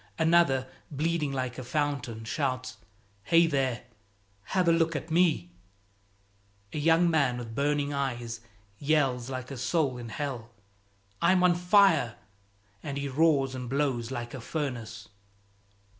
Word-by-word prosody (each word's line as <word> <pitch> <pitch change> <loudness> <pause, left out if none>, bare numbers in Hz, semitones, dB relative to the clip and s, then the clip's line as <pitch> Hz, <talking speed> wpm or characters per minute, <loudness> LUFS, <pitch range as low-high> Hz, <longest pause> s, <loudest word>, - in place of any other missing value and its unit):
Another, 160 -6 +3 0.2
bleeding 155 0 -1
like 130 -2 -3
a - - -5
fountain, 125 -5 -2
shouts, 130 -1 -2 0.5
"Hey, 170 +5 +5
there! 135 -6 -1 0.6
have 185 -2 0
a - - +6
look 165 -1 +2
at 150 +3 -5
me!" 160 - +2 1.2
A - - -2
young 165 +3 +4
man 140 -7 +2
with 115 -2 -7
burning 145 +2 0
eyes 120 -4 -3 0.4
yells 135 -5 +1
like 130 0 -5
a 135 - -6
soul 130 0 0
in 120 -1 -7
hell, 125 -3 -5 0.7
"I'm 180 +1 +4
on 180 -1 +5
fire!" 175 - +4 0.7
and 140 -1 -5
he 140 0 -2
roars 140 -2 +2
and 125 -2 -6
blows 135 -4 0
like 120 -2 -5
a 130 - -6
furnace. 115 -6 -5
140 Hz, 135 wpm, -28 LUFS, 125-160 Hz, 1.2 s, a